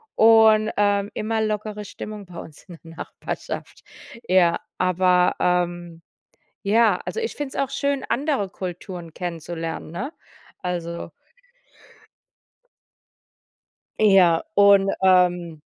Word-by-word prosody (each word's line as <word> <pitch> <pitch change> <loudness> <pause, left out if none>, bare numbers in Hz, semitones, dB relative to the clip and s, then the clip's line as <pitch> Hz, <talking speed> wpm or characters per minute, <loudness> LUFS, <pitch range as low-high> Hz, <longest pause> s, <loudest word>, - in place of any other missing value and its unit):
und, 220 -1 +5
ähm, 205 0 +2
immer 220 +1 -1
lockere 210 -1 -3
Stimmung 210 +1 -8
bei 175 -2 -11
uns 155 - -12
in 175 -3 -12
der 165 0 -13
Nachbarschaft - - -7 0.4
Ja, 175 -2 +3 0.2
aber, 180 0 +2
ähm, 175 -1 -1 0.6
ja, 210 -1 +3
also 455 - -4
ich 455 - -3
finde 290 -2 -5
es - - +2
auch 270 - -5
schön, 280 0 -1
andere 270 -7 0
Kulturen 180 -2 -7
kennenzulernen, 165 -2 -5
ne, 250 - -5 0.5
also 170 -1 -4 2.9
Ja, 190 -6 +5
und, 200 -1 +6
ähm. 180 -4 +2
185 Hz, 105 wpm, -23 LUFS, 175-215 Hz, 2.9 s, und